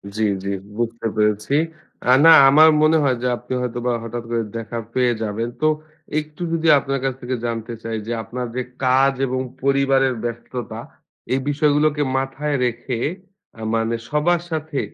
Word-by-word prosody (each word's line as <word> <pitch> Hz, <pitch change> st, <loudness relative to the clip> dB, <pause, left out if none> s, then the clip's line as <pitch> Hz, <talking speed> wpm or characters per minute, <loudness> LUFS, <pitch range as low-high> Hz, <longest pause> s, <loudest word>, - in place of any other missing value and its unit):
জ্বী, 110 Hz, -, +1 dB, 0.2 s
জ্বী, 100 Hz, 0 st, -2 dB, 0.2 s
বুঝতে 115 Hz, -1 st, -2 dB
পেরেছি। 105 Hz, +4 st, +1 dB, 0.6 s
আ -, -, +8 dB
না 165 Hz, -, +10 dB, 0.2 s
আমার 155 Hz, +3 st, +7 dB
মনে 155 Hz, +1 st, +5 dB
হয় 130 Hz, -3 st, +2 dB
যে -, -, +1 dB
আপনি 125 Hz, +1 st, -7 dB
হয়তোবা 120 Hz, 0 st, -2 dB
হঠাৎ 115 Hz, +1 st, -5 dB
করে 115 Hz, -1 st, 0 dB
দেখা 115 Hz, +1 st, -5 dB
পেয়ে 125 Hz, -2 st, +2 dB
যাবেন। 110 Hz, +3 st, -2 dB
তো 155 Hz, -, +4 dB, 0.5 s
একটু 155 Hz, +2 st, -10 dB
যদি 165 Hz, 0 st, 0 dB
আপনার 135 Hz, 0 st, -2 dB
কাছ 135 Hz, -1 st, 0 dB
থেকে 125 Hz, +1 st, -2 dB
জানতে 115 Hz, 0 st, -3 dB
চাই, 115 Hz, 0 st, -3 dB
যে -, -, -3 dB
আপনার 125 Hz, +3 st, -5 dB
যে 125 Hz, -, -1 dB, 0.2 s
কাজ 135 Hz, +2 st, +4 dB
এবং 130 Hz, +1 st, -1 dB, 0.2 s
পরিবারের 135 Hz, -1 st, +3 dB
ব্যস্ততা 120 Hz, +1 st, -5 dB, 0.5 s
এই 130 Hz, -, +2 dB
বিষয়গুলোকে 150 Hz, 0 st, +2 dB, 0.2 s
মাথায় 135 Hz, +2 st, -2 dB
রেখে 120 Hz, +1 st, -3 dB, 0.6 s
আ -, -, -8 dB
মানে 115 Hz, +1 st, 0 dB
সবার 165 Hz, +3 st, +2 dB
সাথে 155 Hz, -2 st, -2 dB
130 Hz, 160 wpm, -21 LUFS, 115-145 Hz, 0.6 s, না